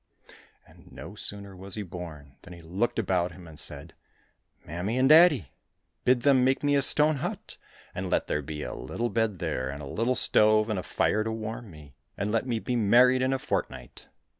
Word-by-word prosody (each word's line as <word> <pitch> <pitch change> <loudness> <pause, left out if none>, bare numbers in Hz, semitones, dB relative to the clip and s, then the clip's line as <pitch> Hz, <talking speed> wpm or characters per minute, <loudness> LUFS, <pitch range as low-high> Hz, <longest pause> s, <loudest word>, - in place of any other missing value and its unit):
And - - -19
no - - -9
sooner 100 -1 -4
was 95 +1 -7
he 105 - -4
born 80 -7 -9
than 90 - -12
he 85 - -12
looked 95 +9 -1
about 90 -5 0
him, 90 -1 -13
and 80 -2 -11
said, 75 +2 -6 0.4
" - - -40
Mammy 90 +9 -3
and 130 +1 +4
daddy! 155 - +6 0.5
Bid 125 -1 +4
them 135 -1 +4
make 130 +2 +1
me 145 0 +2
a 140 - +3
stone 150 +2 +3
hut, - - -5 0.4
and - - -4
let - - +1
there 75 - -1
be 75 +1 -6
a - - -5
little 120 +1 -3
bed 110 -4 0
there, 65 -5 -2
and 70 +1 -6
a 75 - -7
little 115 - -1
stove 110 -1 +3
and 105 - -1
a - - -3
fire 110 +3 0
to 110 - -3
warm 110 0 -6
me, 75 -4 -14 0.2
and 100 +1 -2
let 115 +3 0
me 120 -2 0
be 125 +3 -3
married 125 +4 +5
in 130 +1 +1
a 135 - +1
fortnight - - -4
110 Hz, 210 wpm, -27 LUFS, 85-125 Hz, 0.5 s, daddy